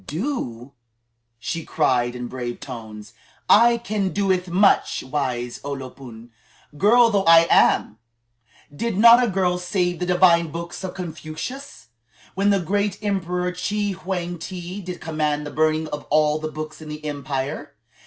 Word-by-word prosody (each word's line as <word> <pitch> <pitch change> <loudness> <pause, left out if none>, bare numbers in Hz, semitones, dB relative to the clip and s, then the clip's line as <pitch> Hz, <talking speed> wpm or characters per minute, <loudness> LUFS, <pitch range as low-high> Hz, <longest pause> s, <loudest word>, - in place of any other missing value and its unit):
"Do?" 145 - -4 0.7
she 165 +7 -4
cried 125 -6 0
in 125 0 -5
brave 120 -1 -5
tones; 110 -5 -9 0.3
"I 235 +2 +6
can 215 -4 -2
do 195 -1 +1
much, 195 +3 +2
wise 130 -3 -3
O 140 0 -4
lo 130 -2 -7
pun, 120 -3 -12 0.4
girl 230 +8 +5
though 200 -2 +1
I 165 0 +7
am! 110 - +3 0.8
Did 230 +4 -2
not 235 +3 +8
a - - +2
girl 180 -2 0
save 180 -1 -1
the 180 - -2
divine 175 -2 +4
books 170 +3 -7
of 185 - -5
Confucius, 170 - -7 0.4
when 200 +2 +1
the 200 -1 +3
great 200 +3 -1
Emperor 180 -3 -1
Chi 205 +3 -2
Hwang 180 -2 -4
ti 180 +2 -7
did 180 -1 -7
command 150 -2 -1
the 145 - -6
burning 155 +1 +1
of 150 -1 -6
all 150 +1 +2
the 155 0 -5
books 155 +1 -7
in 155 - -9
the 150 0 -8
empire? 145 0 -4
170 Hz, 155 wpm, -22 LUFS, 145-190 Hz, 0.8 s, not